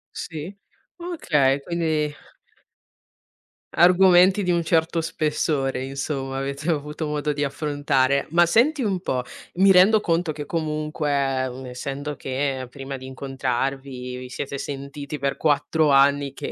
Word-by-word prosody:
Sì, 165 +4 -6 0.4
okay, 150 - +1
quindi 155 -2 -1 1.6
argomenti 185 +2 +6
di 180 - +1
un 170 -1 +1
certo 165 0 +1
spessore, 150 -4 -1
insomma, 135 0 -4
avete 140 +4 -3
avuto 150 0 -2
modo 150 0 -1
di 145 0 -2
affrontare. 140 -2 0
Ma 170 +2 +4
senti 260 - +3
un 195 -4 0
po', 125 -8 -1 0.3
mi 195 +2 +5
rendo 195 +4 +6
conto 170 -3 0
che 150 -1 -6
comunque, 155 -1 -2 0.6
essendo 140 +4 -5
che 130 -1 -3
prima 135 +1 -7
di 130 0 -10
incontrarvi, 130 -1 -3
vi 125 0 -8
siete 140 +1 -5
sentiti 140 +1 -6
per 140 -1 -2
4 150 +1 +2
anni 140 0 +4
che - - -6
145 Hz, 125 wpm, -23 LUFS, 135-165 Hz, 1.6 s, argomenti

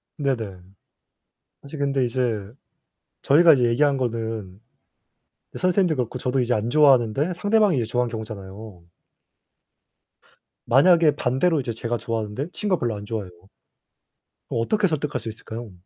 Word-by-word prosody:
네네. 115 - -3 1.0
사실 140 +2 -9
근데 140 -2 0
이제 125 +1 -2 1.0
저희가 160 +3 +6
이제 125 -3 +1
얘기한 135 +4 +2
거는 110 -6 -4 1.0
선생님도 185 -3 +2
그렇고 125 0 -3
저도 125 +2 -1
이제 125 0 0
안 110 +2 -1
좋아하는데 140 +2 +3
상대방이 205 -3 +2
이제 120 - 0
좋아하는 120 +1 -1
경우잖아요. 105 -3 -8 1.8
만약에 160 +3 +4
반대로 145 +5 +1
이제 120 -3 -4
제가 115 +1 -3
좋아하는데 115 +5 -4
친구가 200 -4 -1
별로 120 -3 -1
안 105 - -8
좋아해요. 105 -4 -5 1.2
어떻게 195 - +1
설득할 150 -3 -2
수 115 - -6
있을까요? 110 +1 -8
125 Hz, 325 characters per minute, -23 LUFS, 110-150 Hz, 1.8 s, 저희가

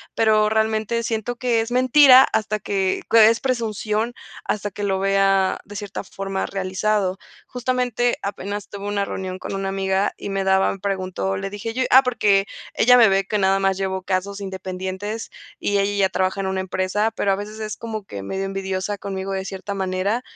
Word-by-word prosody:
pero 215 -1 +3
realmente 220 +1 0
siento 230 +1 -3
que 235 -2 +1
es 225 +2 -5
mentira 255 +1 +7
hasta 215 0 0
que 190 -1 -1
es 225 0 +7
presunción 225 -2 -1 0.3
hasta 205 -1 -2
que 205 +2 -7
lo 190 -1 0
vea 195 -1 +2
de 205 +1 -9
cierta 205 -2 -5
forma 195 0 -4
realizado 190 0 -1 0.3
justamente, 250 -1 0
apenas 200 +1 -5
tuve 200 0 -7
una 200 -1 0
reunión 185 -1 -5
con 195 - -5
una 195 0 -2
amiga 195 0 0
y - - -7
me 195 0 -1
daban 190 0 +2
preguntó, 190 -1 -2
le 195 +1 -4
dije 205 +3 -5
yo 260 +1 0
ah, 260 +1 +8
porque 205 -6 +2 0.3
ella 250 +2 +5
me 230 -3 +7
ve 195 0 +2
que 210 +2 -1
nada 195 0 +2
más 195 -1 +1
llevo 190 -1 -2
casos 195 +2 -2
independientes 190 +3 -5 0.3
y 205 - 0
ella 200 +1 +1
ya - - -19
trabaja 190 +1 -1
en 190 - -2
una 190 0 -1
empresa, 190 +3 -1
pero 200 - +1
a - - +3
veces 210 +2 -7
es 215 0 -4
como 220 -2 -5
que 100 - -7
medio 190 - -3
envidiosa 195 +1 -3
conmigo 195 0 -5
de 190 0 -3
cierta 195 +1 -5
manera 190 +4 -1
200 Hz, 185 wpm, -22 LUFS, 190-220 Hz, 0.3 s, ah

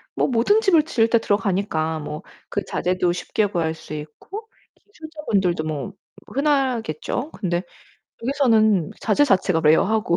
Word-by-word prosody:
뭐 - - +1
모든 260 - +3
집을 345 -7 +4
지을 235 -8 +1
때 235 - +4
들어가니까 195 -7 0
뭐 150 0 -6 0.3
그 - - -2
자재도 180 0 0
쉽게 210 +4 -1
구할 165 -5 -1
수 160 - -10
있고 155 - -8 0.3
기술자분들도 295 - -2
뭐 155 +5 -4 0.3
흔하겠죠. 265 - -1
근데 175 -2 -2 0.6
여기서는 220 - +3
자재 225 +6 +3
자체가 190 - +2
rare하고 170 +5 +3
205 Hz, 315 characters per minute, -22 LUFS, 170-270 Hz, 0.6 s, 집을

